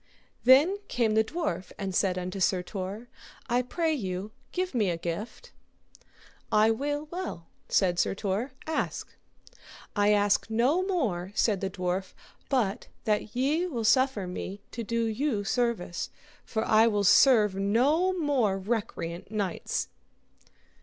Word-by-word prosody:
Then 290 +10 +6
came 230 -3 +1
the 220 0 +4
dwarf 220 - -3
and 195 -2 -4
said 185 0 +1
unto 180 +1 -4
Sir 185 -1 +2
Tor, 195 +5 -6 0.4
I 245 +1 +2
pray 320 +6 -1
you 195 -5 -4 0.2
give 365 -2 -2
me 215 -6 +2
a 170 - -1
gift. 190 - -6 1.0
I 215 +1 +5
will 290 +5 -2
well, 345 - -5 0.2
said 180 -3 +2
Sir - - +1
Tor, 205 +7 -2
ask. 320 0 -3 0.8
I 205 0 +4
ask 205 +1 +2
no 250 +10 +2
more, 240 - -1
said 210 -4 +2
the 195 - -1
dwarf, 185 0 -3 0.3
but 225 -7 0 0.2
that 210 +1 -1
ye 295 +8 +1
will 245 -10 -3
suffer 255 -3 +3
me 185 +2 -6
to 235 - -5
do 230 +1 -1
you 225 -1 -1
service, 220 -6 -1 0.3
for 220 -1 -2
I 220 +1 +5
will 205 -2 +1
serve 215 0 +6
no 250 - +2
more 265 - +1
recreant 190 -5 -3
knights. 200 -5 -2
220 Hz, 140 wpm, -28 LUFS, 195-260 Hz, 1.0 s, Then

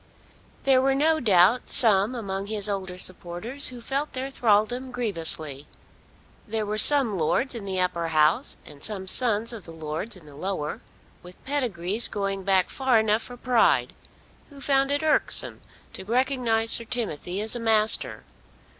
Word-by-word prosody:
There 265 -1 +3
were 270 0 +1
no 315 +3 +2
doubt 210 - +3
some 215 0 +4
among 200 -4 -5
his 210 -1 -2
older 190 -3 -5
supporters 185 - -5
who 250 -1 -7
felt 275 +5 -3
their 265 +1 -5
thraldom 245 +2 0
grievously. 160 - -4 0.8
There 220 0 -3
were 210 +1 -3
some 250 -8 +4
lords 245 - 0
in 225 -4 -7
the 190 -1 -3
Upper 180 -2 -1
House 160 - +2
and 145 -2 -13
some 200 -3 +1
sons 230 +2 +3
of 220 -5 -10
the 165 - -11
lords 160 +7 -5
in 180 -4 -15
the 145 - -15
Lower, 155 -1 -5 0.4
with 180 0 -14
pedigrees 230 -7 +2
going 195 -1 -4
back 190 -1 +1
far 265 -3 +1
enough 220 0 +1
for 245 +2 -8
pride, 245 -1 +1 0.6
who 285 -2 -14
found 275 -1 +1
it 285 +2 -1
irksome 310 - +3 0.3
to - - -9
recognise 235 -1 0
Sir 230 - +1
Timothy 200 -6 -4
as 220 +3 +1
a - - -4
master. 220 -1 +2
215 Hz, 160 wpm, -24 LUFS, 185-250 Hz, 0.8 s, some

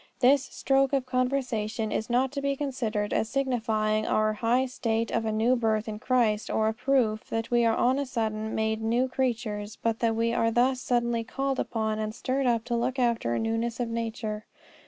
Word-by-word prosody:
This 270 +2 +5
stroke 270 0 +1
of 270 -2 +1
conversion 250 -4 -1
is 220 - -2
not 250 +2 +2
to 280 - -4
be 280 0 0
considered 235 -7 -2
as 220 - 0
signifying 220 -5 0
our 215 0 +2
high 240 +4 +1
state 230 -3 -1
of 225 - 0
a 220 - 0
new 225 +4 +2
birth 220 -2 0
in 210 -1 -5
Christ, 225 -4 +1
or 220 - +1
a 220 - +1
proof 235 -3 0
that 225 +1 -3
we 240 -1 +4
are 225 -1 +3
on 255 +3 +2
a 280 - -1
sudden 220 -3 -2
made 220 0 0
new 235 +3 +1
creatures, 225 -5 -2
but 225 -1 -1
that 225 -1 +1
we 230 +1 +1
are 230 -1 +2
thus 250 +3 +2
suddenly 235 -1 0
called 270 +3 -2
upon 220 -1 -1
and 215 0 -3
stirred 265 +1 -1
up 230 -2 +2
to 240 0 -2
look 245 +3 -1
after 235 - +1
a - - 0
newness 225 +1 -1
of 240 -2 -1
nature. 225 -2 -4
230 Hz, 200 wpm, -27 LUFS, 220-255 Hz, -, This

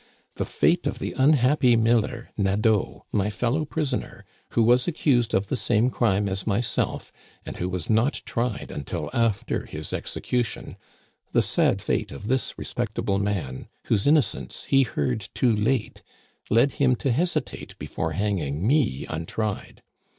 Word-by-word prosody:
The - - -3
fate - - +2
of - - -2
the - - -4
unhappy 130 -2 +4
miller 115 +1 +1
Nadeau, 105 +1 +1
my 100 0 +1
fellow 125 +8 0
prisoner, 145 -4 -3 0.3
who 115 - +4
was 125 +2 +4
accused 125 -8 +2
of 95 - +2
the 100 - -2
same 120 0 +2
crime 105 -5 +1
as 95 +1 -3
myself, 110 +3 -1 0.3
and - - -7
who 90 - -2
was 90 -3 -4
not 115 +6 +1
tried 120 -2 -2
until 70 - -4
after 115 -4 0
his - - -6
execution— 120 -2 -3 0.6
the - - +4
sad - - +1
fate - - -1
of 100 +10 -7
this 130 0 0
respectable 105 -4 -2
man, 95 -11 -3 0.2
whose 105 0 +1
innocence 145 -9 +1
he 135 - +4
heard 110 - -1
too 120 -4 +3
late, 110 +2 0 0.5
led 120 +6 +4
him 130 -2 +4
to 130 +2 -1
hesitate 170 +8 -2
before 80 -1 -3
hanging 90 -5 -1
me 125 - +2
untried. 95 +6 -4
115 Hz, 145 wpm, -25 LUFS, 100-125 Hz, 0.6 s, unhappy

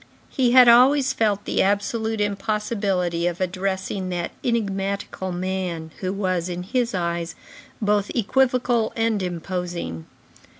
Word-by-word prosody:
He 250 -3 +2
had 255 -1 +8
always 260 +3 +6
felt 205 -3 0
the - - +1
absolute 220 +3 0
impossibility 200 -4 -1
of 175 0 -3
addressing 190 +1 -2
that 175 -1 -3
enigmatical 195 -4 -2
man, 180 -3 -3
who 185 -1 -2
was, 185 -3 -1
in 180 0 -4
his 235 +2 -1
eyes, 170 -1 -2 0.4
both 205 -1 +1
equivocal 245 -1 +2
and 225 -2 +1
imposing. 175 - -4
195 Hz, 120 wpm, -23 LUFS, 180-225 Hz, 0.4 s, had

